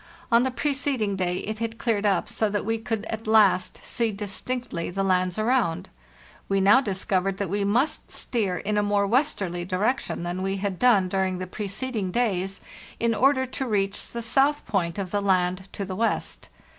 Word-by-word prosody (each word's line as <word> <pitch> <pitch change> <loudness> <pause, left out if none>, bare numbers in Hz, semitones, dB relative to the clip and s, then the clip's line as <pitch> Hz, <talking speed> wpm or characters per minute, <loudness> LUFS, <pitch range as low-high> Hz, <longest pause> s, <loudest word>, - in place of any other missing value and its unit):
On 235 0 +6
the 260 - +1
preceding 260 -5 0
day 180 -2 -1
it 215 +1 -5
had 230 0 -3
cleared 215 -4 0
up 200 - +1
so 220 - 0
that 205 -1 -2
we 225 +1 0
could 225 -1 -3
at 220 0 -5
last 205 -4 +4
see 230 -2 0
distinctly 205 0 -3
the 195 +2 -2
lands 185 -1 +1
around. 215 -7 +1 0.6
We 195 0 +2
now 205 +7 +6
discov 195 -4 0
ered 195 -1 -1
that 195 -4 -3
we 200 0 0
must 240 +9 0
steer 200 -7 -1
in 210 +4 -1
a - - +3
more 205 -1 +2
westerly 200 - 0
direction 195 +4 -1
than 175 +2 -3
we 195 +1 -1
had 195 -2 -3
done 220 -7 +4
during 190 -1 0
the 185 - -4
preceding 210 +2 -3
days, 195 -3 -1 0.4
in 230 0 +2
order 260 +4 +3
to 260 +1 -4
reach 200 -3 -1
the 235 0 -5
south 275 +5 +2
point 175 -4 -1
of 190 -3 -4
the 205 - 0
land 185 -1 +1
to 200 - -4
the 190 -1 -5
west. 225 +3 -1
205 Hz, 190 wpm, -25 LUFS, 190-230 Hz, 0.6 s, On